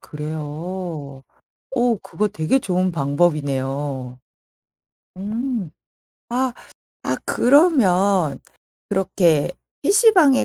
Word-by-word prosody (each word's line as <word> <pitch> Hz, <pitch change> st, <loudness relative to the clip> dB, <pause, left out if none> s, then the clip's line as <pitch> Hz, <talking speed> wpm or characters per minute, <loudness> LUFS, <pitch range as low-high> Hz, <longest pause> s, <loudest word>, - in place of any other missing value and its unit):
그래요? 155 Hz, -1 st, -6 dB, 0.6 s
어 240 Hz, -1 st, +3 dB
그거 210 Hz, -, -2 dB
되게 170 Hz, +7 st, 0 dB
좋은 185 Hz, -4 st, 0 dB
방법이네요. 140 Hz, -4 st, -1 dB, 1.0 s
음. 220 Hz, -, -3 dB, 0.6 s
아. 250 Hz, +1 st, 0 dB, 0.5 s
아 -, -, 0 dB
그러면 200 Hz, -, +3 dB, 0.5 s
그렇게 180 Hz, -6 st, +2 dB, 0.3 s
PC방에 390 Hz, -, +5 dB
180 Hz, 160 characters per minute, -21 LUFS, 150-235 Hz, 1.0 s, PC방에